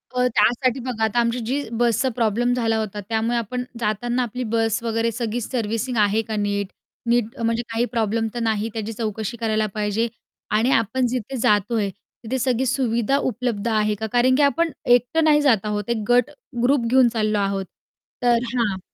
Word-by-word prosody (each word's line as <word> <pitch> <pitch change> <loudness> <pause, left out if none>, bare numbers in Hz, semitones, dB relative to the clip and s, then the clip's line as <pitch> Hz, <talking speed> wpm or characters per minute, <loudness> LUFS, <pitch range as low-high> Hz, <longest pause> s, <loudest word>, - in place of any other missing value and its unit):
अ, 250 0 +3
त्यासाठी 250 +3 +2
बघा 240 -3 -3
आता 220 +2 +1
आमची 235 +1 +1
जी 270 +5 -1 0.2
बसचा 240 +2 +2
प्रॉब्लेम 240 +1 +1
झाला 225 -2 +1
होता, 210 -2 -3
त्यामुळे 225 +2 0
आपण 245 +2 -3 0.2
जाताना 240 +3 0
आपली 250 +2 -4
बस 225 0 +1
वगैरे 230 0 0
सगळी 235 +1 -3
सर्व्हिसिंग 230 +1 -2
आहे 205 +2 +2
का 220 - -3
नीट, 205 -1 -1 0.4
नीट 235 0 +1
अ, 230 - -4
म्हणजे 230 +1 0
काही 230 +1 0
प्रॉब्लेम 225 -1 0
तर 240 - -3
नाही, 220 0 0
त्याची 225 0 -4
चौकशी 220 +1 -4
करायला 220 -1 0
पाहिजे. 210 +2 0 0.4
आणि 225 +5 +2
आपण 230 +3 +2
जिथे 255 +2 -3
जातोय 210 -1 +2 0.3
तिथे 255 +4 -2
सगळी 255 +1 +1
सुविधा 245 0 +1
उपलब्ध 235 -4 -2
आहे 215 -1 +1
का? 220 +2 -4
कारण 250 +1 +4
की 290 - +2
आपण 330 +3 +2
एकटं 245 +6 +3
नाही 300 -1 +5
जात 230 -8 +3
आहोत, 210 0 -3
एक 235 - +1
गट, 245 +3 +4 0.3
ग्रुप 255 -1 +3
घेऊन 255 0 +5
चाललो 215 -2 0
आहोत. 195 -1 -1 0.6
तर 240 -1 +4 0.2
हां 210 -6 0
230 Hz, 180 wpm, -22 LUFS, 215-245 Hz, 0.6 s, नाही